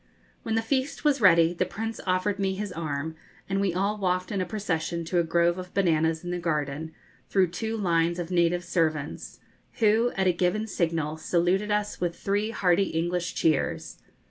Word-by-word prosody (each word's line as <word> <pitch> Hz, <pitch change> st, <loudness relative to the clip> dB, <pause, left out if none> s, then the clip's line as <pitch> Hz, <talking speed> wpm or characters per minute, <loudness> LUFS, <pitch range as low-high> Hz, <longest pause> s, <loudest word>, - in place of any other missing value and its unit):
When 225 Hz, -, -2 dB
the 225 Hz, -, +1 dB
feast 270 Hz, +5 st, -1 dB
was 285 Hz, -3 st, +3 dB
ready 170 Hz, -3 st, +6 dB
the 180 Hz, -, 0 dB
Prince 225 Hz, +4 st, -5 dB
offered 185 Hz, +2 st, +1 dB
me 190 Hz, -1 st, 0 dB
his 205 Hz, 0 st, -4 dB
arm, 160 Hz, -2 st, -3 dB, 0.3 s
and 195 Hz, 0 st, 0 dB
we 195 Hz, -2 st, +1 dB
all 200 Hz, +4 st, -1 dB
walked 185 Hz, -1 st, 0 dB
in 195 Hz, -2 st, -1 dB
a 180 Hz, -, -2 dB
procession 170 Hz, -5 st, -2 dB
to 175 Hz, +2 st, +1 dB
a -, -, +3 dB
grove 170 Hz, +2 st, +2 dB
of 180 Hz, 0 st, -9 dB
bananas 160 Hz, -3 st, +2 dB
in 175 Hz, -, -4 dB
the 175 Hz, -, -2 dB
garden 155 Hz, -2 st, -2 dB, 0.4 s
through 190 Hz, -3 st, +3 dB
two 220 Hz, +5 st, -3 dB
lines 170 Hz, -3 st, +1 dB
of 175 Hz, 0 st, -4 dB
native 175 Hz, 0 st, +2 dB
servants, 155 Hz, -4 st, -2 dB, 0.3 s
who, 225 Hz, +1 st, +3 dB
at 190 Hz, -, +1 dB
a 180 Hz, -, +4 dB
given 180 Hz, +5 st, 0 dB
signal, 165 Hz, -6 st, -1 dB
saluted 180 Hz, +5 st, +1 dB
us 210 Hz, -2 st, -1 dB
with 175 Hz, -1 st, -1 dB
three 205 Hz, +4 st, -1 dB
hearty 195 Hz, -3 st, +2 dB
English 175 Hz, 0 st, -2 dB
cheers. 155 Hz, -3 st, 0 dB
180 Hz, 185 wpm, -27 LUFS, 165-200 Hz, 0.4 s, ready